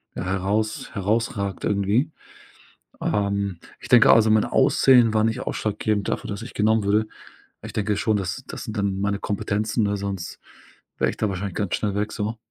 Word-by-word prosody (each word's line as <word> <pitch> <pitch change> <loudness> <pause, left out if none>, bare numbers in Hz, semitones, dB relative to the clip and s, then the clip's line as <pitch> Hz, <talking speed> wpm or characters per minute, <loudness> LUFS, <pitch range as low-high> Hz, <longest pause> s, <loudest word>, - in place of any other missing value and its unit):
heraus 100 +4 -1
herausragt 100 -1 -1
irgendwie. 105 +9 +1 0.9
Ähm, 100 -3 -1 0.2
ich - - -11
denke 120 -2 +7
also, 110 -1 +5
mein 110 -1 +4
Aussehen 130 -4 +4
war 110 0 +3
nicht 115 - -1
ausschlaggebend 105 -1 -2
dafür, - - -3
dass 100 +1 -4
ich 125 - -9
genommen 110 0 +2
wurde. 105 +2 +2 0.6
Ich 110 0 -8
denke 105 -2 0
schon, 110 -2 +1
das 95 -2 -4
das - - -7
sind 110 0 -6
dann 100 -1 -1
meine 100 0 0
Kompetenzen, 105 +2 -1
ne, 100 0 0
sonst 100 -3 -5 0.6
wäre - - +2
ich - - -11
da 110 - 0
wahrscheinlich 95 0 -4
ganz 100 -4 -1
schnell 100 -2 -2
weg, 105 +1 -1
so. 110 +2 -3
105 Hz, 175 wpm, -23 LUFS, 100-110 Hz, 0.9 s, denke